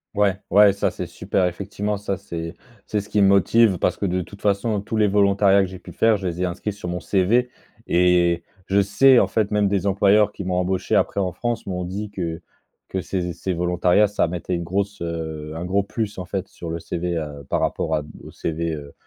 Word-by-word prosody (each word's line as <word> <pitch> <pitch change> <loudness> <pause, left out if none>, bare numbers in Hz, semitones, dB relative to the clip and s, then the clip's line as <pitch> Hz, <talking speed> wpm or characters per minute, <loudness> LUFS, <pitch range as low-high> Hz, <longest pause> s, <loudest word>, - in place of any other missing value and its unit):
Ouais, 100 -2 +2
ouais, 100 +1 +6
ça, 100 - 0
c'est - - -5
super 95 - -1
effectivement. 100 +3 -3
Ça, 100 -2 -3
c'est 85 -3 -6 0.3
c'est 105 - -1
ce 100 - -14
qui 105 - +2
me 100 - +6
motive 100 +1 +4
parce - - 0
que, 100 - -2
de 90 0 0
toute 100 +3 -11
façon, 105 +2 +1
heu, - - -5
tous 110 - -5
les 105 -1 +3
volontariats 100 0 +4
que 95 - 0
j'ai 95 0 -10
pu - - -12
faire, 115 -2 +3
je 95 - -7
les 90 +1 -3
ai - - +2
inscrits 95 +3 -3
sur 100 -3 -7
mon 90 0 -3
CV 105 +8 +2 0.4
et 85 -1 +3 0.2
je 100 +1 +3
sais, 120 +6 +5
en - - +3
fait, 110 -2 0
même 105 -1 +2
des 100 0 0
employeurs 100 +2 +4
qui 100 - -7
m'ont 90 0 -2
embauché 90 +1 0
après - - +1
en 90 -2 -1
France 120 -1 -3
m'ont 90 -1 -3
dit 100 +4 -5
que 85 -4 -4 0.5
que 95 - -2
ces 90 -1 -3
z - - -18
ces 95 - -2
volontariats, 90 +4 +3
ça 100 -3 0
mettait 90 +1 -3
une 85 - -3
grosse 100 +3 -2
heu, 80 -2 -5
un 85 - -4
gros 100 +2 +1
plus, 105 0 -4
en 90 - -5
fait, 95 +1 -4
sur 85 - -9
le 85 +1 -3
CV, 85 +1 -3
heu, 75 -2 -5
par - - +1
rapport 80 - -1
à 75 - 0
d 75 - -12
aux - - -10
CV, 80 0 -3
heu, 70 -1 -10
95 Hz, 240 wpm, -22 LUFS, 85-100 Hz, 0.5 s, ouais